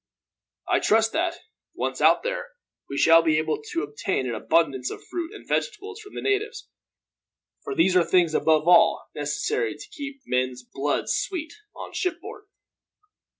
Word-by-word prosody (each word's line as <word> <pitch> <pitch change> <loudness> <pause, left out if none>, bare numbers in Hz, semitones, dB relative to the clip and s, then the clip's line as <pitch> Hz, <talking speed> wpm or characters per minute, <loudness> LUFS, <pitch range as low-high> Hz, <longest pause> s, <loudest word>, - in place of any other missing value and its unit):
"I - - +3
trust 225 +1 +3
that, 335 +1 0 0.4
once - - -3
out - - +5
there, - - -3 0.4
we 140 - -4
shall 165 +2 +7
be 160 -2 +2
able 155 -1 -1
to 150 +2 -3
obtain 145 -1 -2
an 120 - -2
abundance 135 +1 +1
of - - -8
fruit 345 0 -5
and 420 - -12
vegetables 430 -3 -2
from 410 -1 -13
the - - -5
natives; 410 +1 -1 1.0
for 415 - -4
these 190 - +3
are 180 - +6
things, 170 -2 +2
above 155 0 +2
all, 175 -1 +5
necessary 145 -5 -2
to 145 - -11
keep 275 -1 -7
men's 125 0 -1
blood 240 - -2
sweet 335 -5 -2 0.2
on - - -8
shipboard. 385 +4 -4
180 Hz, 155 wpm, -25 LUFS, -, 1.0 s, shall